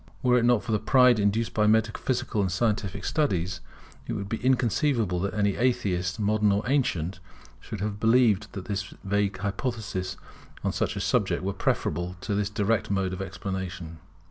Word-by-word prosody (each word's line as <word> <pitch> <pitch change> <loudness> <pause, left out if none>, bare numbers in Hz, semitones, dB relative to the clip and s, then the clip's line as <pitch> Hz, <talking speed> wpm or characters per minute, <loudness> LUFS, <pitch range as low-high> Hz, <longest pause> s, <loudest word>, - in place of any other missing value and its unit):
Were 125 -1 +4
it 120 - +1
not 120 -3 +3
for 120 - -4
the 105 - +2
pride 125 +1 +5
induced 105 +3 +1
by 105 -1 +2
metaphysical 110 +1 +1
and 95 -2 0
scientific 100 -1 -1
studies, 90 - 0 0.5
it - - -2
would 100 - -4
be 115 - -1
inconceivable 120 -5 +2
that 100 +2 -2
any 100 -2 +1
atheist, 100 -8 0
modern 105 0 +2
or 100 +2 +1
ancient, 95 - 0 0.4
should 105 - -7
have 105 0 -3
believed 110 -3 +3
that 95 -3 -7
his 100 -2 -4
vague 100 0 0
hypotheses 100 -2 -3 0.5
on - - +1
such - - -1
a - - -3
subject 90 -3 +1
were 100 +1 -1
preferable 90 -2 -1
to 105 - -2
this 100 0 0
direct 105 +1 0
mode 95 -2 0
of 95 - -5
explanation. 95 -3 -5
100 Hz, 170 wpm, -27 LUFS, 95-115 Hz, 0.5 s, pride